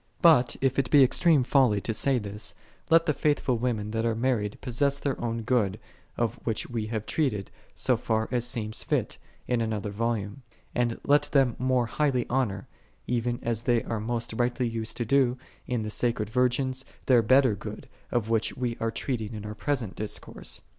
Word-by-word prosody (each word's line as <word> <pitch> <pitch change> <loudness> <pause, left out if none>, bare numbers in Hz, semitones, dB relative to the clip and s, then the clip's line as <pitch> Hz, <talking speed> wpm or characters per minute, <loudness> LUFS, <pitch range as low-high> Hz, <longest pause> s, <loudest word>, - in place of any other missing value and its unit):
But, 140 -8 +6
if 135 0 +2
it 130 -3 0
be 145 -2 +7
extreme 150 +2 +4
folly 125 -5 +3
to 110 - -1
say 135 +4 +2
this, 105 -2 -5 0.3
let 165 0 +5
the 150 - +2
faithful 145 -5 +1
women 110 -4 -1
that 110 0 -1
are 115 -1 +1
married 115 -4 0
possess 140 +3 0
their 140 -1 -2
own 115 -1 -2
good, 110 -4 +1 0.4
of 115 -3 -1
which 115 -3 -2
we 115 -3 -3
have 110 -1 -3
treated, 115 - -1 0.2
so - - +2
far 110 0 0
as 120 -2 +1
seemed 110 -3 -2
fit, - - -2 0.3
in 125 -2 +1
another 110 -2 -2
volume; 110 +1 -2 0.3
and 120 -2 0
let 145 +1 +4
them 135 -5 +3
more 130 -1 +2
highly 130 0 0
honor, 110 -7 0 0.4
even 120 0 -1
as 115 -1 -1
they 120 -1 +2
are 115 - -3
most 115 +1 -3
rightly 120 +2 0
used 115 -1 -4
to 120 - -1
do, 130 +1 +3 0.3
in 120 -3 -1
the 105 - -4
sacred 110 -2 -1
virgins, 130 +2 +1 0.2
their 125 -3 +5
better 130 +1 +4
good, 100 - -8 0.2
of 120 -3 0
which 115 -1 0
we 120 -2 -2
are 115 - 0
treating 115 -2 -3
in 105 -1 -7
our 105 - -5
present 120 -4 -2
discourse. 105 -1 -5
120 Hz, 185 wpm, -27 LUFS, 110-130 Hz, 0.4 s, be